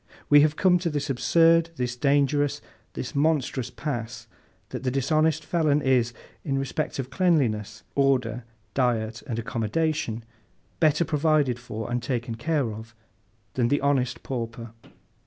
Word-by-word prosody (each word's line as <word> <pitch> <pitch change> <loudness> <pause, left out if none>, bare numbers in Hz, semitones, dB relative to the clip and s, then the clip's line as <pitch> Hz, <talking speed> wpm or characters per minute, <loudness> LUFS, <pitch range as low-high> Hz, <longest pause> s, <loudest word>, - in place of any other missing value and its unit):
We 145 0 +9
have 150 0 +3
come 180 0 +4
to 170 -1 -1
this 145 -2 -2
absurd, 165 +5 +4
this 125 -3 -2
dangerous, 140 +1 +2 0.3
this - - -5
monstrous 140 -4 0
pass, 120 -6 -5 0.4
that - - -5
the 130 - 0
dishonest 155 +4 +1
felon 155 -4 +2
is, 125 -3 +2 0.3
in 135 -3 -1
respect 135 +3 -2
of 135 -1 -4
cleanliness, 120 - +1
order, 125 -4 +1 0.3
diet, 115 -3 0
and 115 -4 -3
accommodation, 115 +2 -1 0.6
better 155 +1 +3
provided 150 -5 +1
for, 115 -1 -6
and 120 0 0
taken 120 -1 -3
care 135 -1 -1
of, 110 +1 -10 0.6
than 120 -2 +1
the 145 +4 +2
honest 135 -3 0
pauper. 115 -2 -5
135 Hz, 140 wpm, -26 LUFS, 120-150 Hz, 0.6 s, We